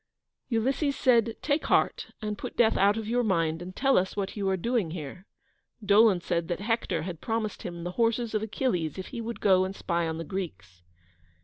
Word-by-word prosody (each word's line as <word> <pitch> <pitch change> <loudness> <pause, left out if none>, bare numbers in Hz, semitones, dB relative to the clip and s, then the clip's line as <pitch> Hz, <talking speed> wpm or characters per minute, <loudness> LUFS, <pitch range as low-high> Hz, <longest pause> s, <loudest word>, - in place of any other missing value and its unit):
Ulysses 270 +5 +1
said, 235 -3 +3
"Take 285 +2 0
heart, - - +2 0.2
and 210 -1 -2
put - - -7
death 225 -2 +4
out 200 +2 +4
of 220 -1 -4
your 245 +2 +1
mind, 165 -5 +1
and 185 +1 -8
tell 270 -4 +4
us 190 +2 -3
what 195 -1 -2
you 200 -2 -1
are 190 - +1
doing 230 -2 0
here." 165 +3 -7 0.6
Dolon 205 -2 +5
said 170 -1 -1
that 175 - -2
Hector 200 -7 -1
had 170 -2 -6
promised 225 -2 -2
him 170 -1 -6
the 175 - -3
horses 230 0 +1
of 215 - +1
Achilles 210 - -1
if 190 - -6
he 240 -3 -5
would 230 +1 -5
go 185 -2 +4
and 190 +1 -4
spy 170 -3 -1
on 160 0 -3
the 165 - -4
Greeks. 165 - -6
200 Hz, 205 wpm, -28 LUFS, 175-230 Hz, 0.6 s, Dolon